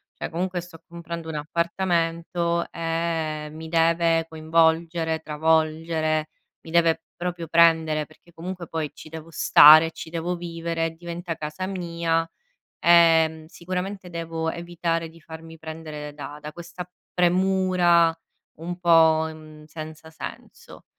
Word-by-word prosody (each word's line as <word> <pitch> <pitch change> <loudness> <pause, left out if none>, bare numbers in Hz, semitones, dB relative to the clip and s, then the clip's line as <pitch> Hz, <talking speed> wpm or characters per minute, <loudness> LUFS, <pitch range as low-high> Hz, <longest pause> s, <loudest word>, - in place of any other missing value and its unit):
Cioè - - -5
comunque 180 +2 -2
sto 175 -2 -12
comprando 170 -1 -7
un 160 - -5
appartamento 170 +1 -1
e 165 -2 -2
mi 160 +1 -9
deve 165 0 +2
coinvolgere, 160 +1 +1
travolgere, 155 0 0 0.4
mi 160 - -9
deve 165 -1 +3 0.2
proprio 175 -2 -3
prendere, 160 -2 +4
perché 170 +3 -22
comunque 175 +1 -7
poi 155 -2 -3
ci - - -12
devo 160 0 -9
stare, 155 +1 +8
ci 160 - -9
devo 170 +2 -3
vivere, 165 -1 -3
diventa 170 0 -6
casa 155 +4 -5
mia, 170 -3 -1 0.5
ehm, 165 -2 +5
sicuramente 185 +3 -5
devo 165 -1 -3
evitare 170 -1 -3
di 165 +1 -16
farmi 160 +1 -11
prendere 155 -2 -7
da 145 0 -8
da 150 - -7
questa 175 +2 -9 0.3
premura 180 -2 +3 0.4
un 175 +2 -6
po' 160 -2 +5
mhmm, 155 -1 -13
senza 155 0 -9
senso, 160 - -10
165 Hz, 125 wpm, -24 LUFS, 160-170 Hz, 0.5 s, stare